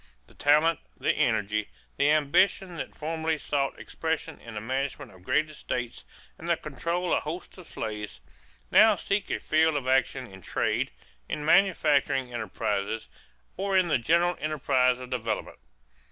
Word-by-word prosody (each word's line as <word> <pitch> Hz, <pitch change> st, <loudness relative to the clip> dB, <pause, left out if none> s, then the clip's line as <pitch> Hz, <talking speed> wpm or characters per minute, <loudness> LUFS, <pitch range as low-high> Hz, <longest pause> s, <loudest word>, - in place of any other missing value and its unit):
The -, -, -21 dB
talent, 150 Hz, +3 st, +3 dB, 0.2 s
the -, -, +2 dB
energy, 105 Hz, +1 st, 0 dB, 0.3 s
the 140 Hz, +1 st, +3 dB
ambition 170 Hz, +5 st, +3 dB
that -, -, -6 dB
formerly 160 Hz, +1 st, -1 dB
sought 140 Hz, -2 st, -1 dB
expression 160 Hz, 0 st, -3 dB
in 115 Hz, -2 st, -10 dB
the -, -, -2 dB
management 135 Hz, +3 st, -3 dB
of 95 Hz, -2 st, -17 dB
great 150 Hz, +11 st, +1 dB
estates 125 Hz, -5 st, -5 dB, 0.3 s
and 165 Hz, -, -8 dB
the 170 Hz, -1 st, +2 dB
control 170 Hz, +5 st, -2 dB
of -, -, +2 dB
hosts 160 Hz, +4 st, -6 dB
of 175 Hz, -, -12 dB
slaves, 105 Hz, -, -5 dB, 0.5 s
now 220 Hz, -1 st, +7 dB
seek 200 Hz, 0 st, -1 dB
a -, -, -1 dB
field 160 Hz, 0 st, +2 dB
of 135 Hz, -3 st, -2 dB
action 130 Hz, 0 st, +2 dB
in 95 Hz, -4 st, -13 dB
trade, -, -, 0 dB, 0.4 s
in 150 Hz, -, -3 dB
manufacturing 150 Hz, -8 st, +3 dB
enterprises, 105 Hz, -1 st, -2 dB, 0.5 s
or 195 Hz, 0 st, +1 dB
in 180 Hz, -2 st, +3 dB
the 145 Hz, -, +3 dB
general 170 Hz, +7 st, +3 dB
enterprises 130 Hz, -4 st, +2 dB
of 125 Hz, -, -10 dB
development. 115 Hz, -3 st, -3 dB
145 Hz, 155 wpm, -27 LUFS, 125-165 Hz, 0.5 s, now